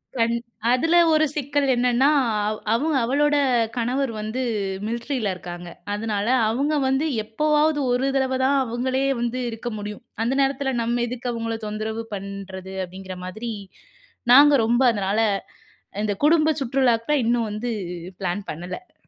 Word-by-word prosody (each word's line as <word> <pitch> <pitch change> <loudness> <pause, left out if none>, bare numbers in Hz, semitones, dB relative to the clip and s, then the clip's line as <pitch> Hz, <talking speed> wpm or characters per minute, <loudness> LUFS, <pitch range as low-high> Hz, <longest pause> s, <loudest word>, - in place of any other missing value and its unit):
கண் 230 0 +2 0.4
அதுல 325 +7 +3 0.2
ஒரு 310 0 +4
சிக்கல் 285 -1 0
என்னன்னா, 250 +3 +3 0.4
அவ் 215 - -4
அவங்க 295 +5 +1
அவளோட 290 +4 +2 0.4
கணவர் 250 +2 0
வந்து 215 +4 -3 0.5
மிலிட்ரில 235 -2 -2
இருக்காங்க. 175 0 -8 0.3
அதனால 210 -1 -2 0.2
அவுங்க 280 +7 0
வந்து 270 +3 +1 0.2
எப்போவாவது 300 +6 +1
ஒரு 250 +2 +1
தடவை 260 -1 +1
தான் 280 +1 +3
அவுங்களே 255 +2 -1 0.2
வந்து 240 +1 -1
இருக்க 230 +1 -5
முடியும். 210 +3 -7 0.2
அந்த 240 - 0
நேரத்தில, 270 0 0
"நம்ம 240 +1 0
எதுக்கு 245 +1 -4
அவுங்கள 230 -1 -3
தொந்தரவு 220 +2 -3
பண்றது?" 195 -1 -7
அப்படீங்கிற 185 +1 -9
மாதிரி. 220 +6 -5 0.8
நாங்க 290 +3 +8
ரொம்ப 240 +3 +2
அதனால, 200 +1 0 0.8
இந்த 210 -1 0
குடும்ப 315 0 +4
சுற்றுலாக்கு 260 +1 +2
இன்னும் 235 -2 +1
வந்து 235 +3 -3 0.5
பிளான் 185 +2 -2
பண்ணல. 180 - -8
240 Hz, 130 wpm, -23 LUFS, 215-270 Hz, 0.8 s, நாங்க